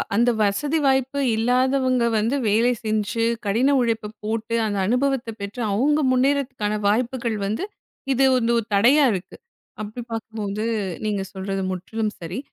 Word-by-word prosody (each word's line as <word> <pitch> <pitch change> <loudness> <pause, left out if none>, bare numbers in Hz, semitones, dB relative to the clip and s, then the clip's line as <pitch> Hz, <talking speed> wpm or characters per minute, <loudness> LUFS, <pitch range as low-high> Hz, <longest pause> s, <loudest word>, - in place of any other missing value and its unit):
அந்த 240 +3 +4
வசதி 285 +10 0
வாய்ப்பு 265 +1 +1 0.2
இல்லாதவங்க 255 +2 +2
வந்து 225 +6 +1
வேலை 230 +4 +3
செஞ்சு 215 +1 0 0.2
கடின 245 +8 +2
உழைப்பு 225 -3 -1 0.2
போட்டு 225 +1 -2
அந்த 205 -2 -2
அனுபவத்தைப் 250 -1 0
பெற்று 200 +5 -5
அவங்க 290 +8 +2
முன்னேறுதற்கான 255 -5 0
வாய்ப்புகள் 235 +1 0
வந்து 215 - -2 0.5
இது, 265 +1 +2
உ - - +4 0.2
ஒரு 230 - -1
தடையாக 260 +6 +5
இருக்கு. 185 -1 -6 0.4
அப்படி 215 +3 -6
பார்க்கும்போது 215 -2 -4 0.4
நீங்கச் 200 -2 -2
சொல்றது 195 0 -3
முற்றிலும் 210 +4 -3
சரி. 175 +6 -5
225 Hz, 135 wpm, -23 LUFS, 210-255 Hz, 0.5 s, தடையாக